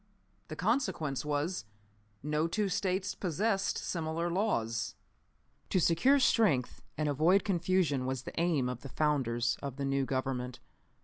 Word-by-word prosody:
The 155 - -6
consequence 180 - 0
was, 150 - -1 0.6
no 150 +2 0
two 205 +3 0
States 190 0 -1
possessed 195 +3 0
similar 165 0 -2
laws. 115 - -1 0.7
"To 185 - +2
secure 175 - +4
strength 210 - +2 0.2
and 155 0 0
avoid 160 +7 +3
confusion 175 -8 +1
was 130 -1 -2
the - - -7
aim 165 -7 +2
of 125 -1 -4
the 140 - -8
founders 120 -4 0
of 140 -3 -5
the 140 0 -3
new 135 0 +1
Government. 130 -2 -2
155 Hz, 135 wpm, -31 LUFS, 135-185 Hz, 0.7 s, secure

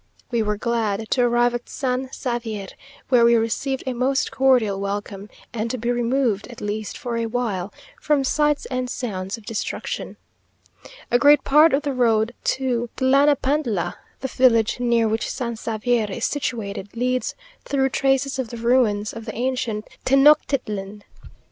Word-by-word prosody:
We 235 -2 +1
were 210 -1 -1
glad 225 -2 -1
to 255 - +3
arrive 240 0 +3
at 240 0 -5
San 260 -1 -2
Xavier, 225 -7 -4 0.4
where 245 -3 +5
we 235 0 +6
received 235 +4 -1
a 260 - -2
most 260 +2 0
cordial 245 -7 +3
welcome, 200 0 -4 0.2
and 230 0 -2
to 255 - -2
be 235 +1 -1
removed, 240 -3 0
at 240 - -11
least 210 +1 -4
for 240 -4 -4
a 230 0 -1
while, 215 -5 -2 0.3
from 295 -2 +2
sights 295 +2 +1
and 255 -1 -2
sounds 195 -6 -4
of 225 - -16
destruction. 225 -1 -4 0.9
A 245 - +4
great 290 +3 +6
part 300 +3 +6
of 275 +2 +1
the 285 -2 -1
road 230 -2 +2
to 245 -3 0
Tlanapantla, 270 - +2 0.3
the 265 - -2
village 245 -4 +3
near 235 -2 +2
which 220 +1 -1
San 240 -3 -3
Xavier 225 +1 -1
is 230 +5 -2
situated, 220 -7 -4
leads 255 +1 -1 0.3
through 270 -1 +1
traces 270 0 +1
of 250 -4 -2
the 235 - -7
ruins 230 -3 +2
of 225 -1 -8
the 220 - -6
ancient 240 -3 -2 0.2
Tenochtitlan. 255 -8 +2
240 Hz, 155 wpm, -22 LUFS, 220-260 Hz, 0.9 s, we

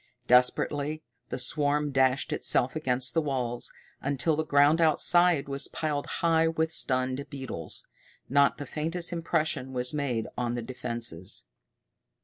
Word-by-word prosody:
Desperately 145 +5 +2 0.3
the - - -3
swarm 145 +3 0
dashed 130 0 +2
itself 130 +4 +1
against 125 -4 +1
the 165 - +2
walls, 125 -5 -2 0.3
until 145 +3 0
the 160 - -1
ground 145 +2 +4
outside 165 0 +3
was 140 0 -2
piled 150 -2 -3
high 165 -1 +2
with 160 0 -1
stunned 130 -1 +2
beetles. 125 - -6 0.4
Not 140 +2 +3
the 145 - -6
faintest 165 +4 -2
impression 160 -5 -1
was 125 +1 0
made 130 -7 -1
on 120 -1 -2
the 120 - -4
defenses. 115 -7 -3
140 Hz, 130 wpm, -28 LUFS, 125-155 Hz, 0.4 s, ground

